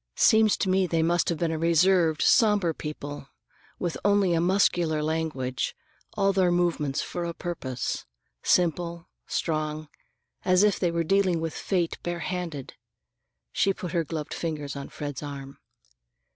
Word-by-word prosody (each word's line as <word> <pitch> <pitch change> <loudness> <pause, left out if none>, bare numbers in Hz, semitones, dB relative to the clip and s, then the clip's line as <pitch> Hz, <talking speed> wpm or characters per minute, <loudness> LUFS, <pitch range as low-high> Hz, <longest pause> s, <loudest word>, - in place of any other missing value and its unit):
Seems 220 -2 +5
to - - -1
me 190 0 +2
they 165 -1 +1
must 170 +1 +2
have 170 - 0
been 165 0 0
a 160 - -2
reserved, 170 0 +3
somber 210 -8 +4
people, 145 -2 -7 0.5
with 175 -2 -3
only 200 -3 +3
a 165 - +2
muscular 175 -4 +2
language, 150 -5 -2 0.4
all 195 -1 +3
their 185 -2 +3
movements 170 -6 0
for 175 - -4
a 170 -1 -4
purpose; 140 -8 -4 0.3
simple, 170 -1 +1 0.2
strong, 155 -1 -2 0.5
as 185 +1 +4
if 210 -1 +3
they 175 - +2
were 170 0 0
dealing 185 -1 +2
with 160 -1 -3
fate 175 -4 -1
bare 175 0 -3
handed." 175 -7 -4 0.8
She 195 -1 +1
put 180 - -6
her 170 -2 +1
gloved 155 -1 -5
fingers 150 -4 -4
on 140 0 -6
Fred's 145 -4 -6
arm. 140 -2 -8
170 Hz, 150 wpm, -26 LUFS, 155-180 Hz, 0.8 s, Seems